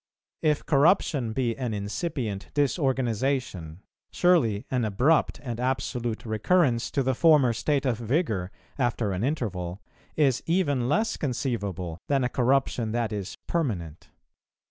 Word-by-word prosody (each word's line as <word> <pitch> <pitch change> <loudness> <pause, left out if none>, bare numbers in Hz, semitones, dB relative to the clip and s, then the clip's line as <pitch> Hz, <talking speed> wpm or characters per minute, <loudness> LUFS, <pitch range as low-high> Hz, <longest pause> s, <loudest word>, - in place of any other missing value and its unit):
If 150 -2 +1
corruption 140 - +3
be 120 -1 -1
an 125 -5 -3
incipient 105 - -3
disorganization, 130 - -1 0.3
surely 140 - +2
an 125 -2 +1
abrupt 125 +10 +2
and 120 -3 -4
absolute 125 -2 -2
recurrence 120 - +2
to 140 - 0
the 130 +1 +1
former 145 -3 +4
state 140 +5 0
of 120 -4 0
vigour, 115 - -1 0.3
after 120 -4 0
an 95 +2 -2
interval, 100 - -2 0.4
is 135 -5 +2
even 145 -8 +1
less 215 +9 +1
conceivable 100 - -3
than 140 -2 +2
a 125 - +1
corruption 125 -3 +1
that 115 -2 -1
is 100 0 -5
permanent. 95 - -3
125 Hz, 125 wpm, -26 LUFS, 110-140 Hz, 0.4 s, former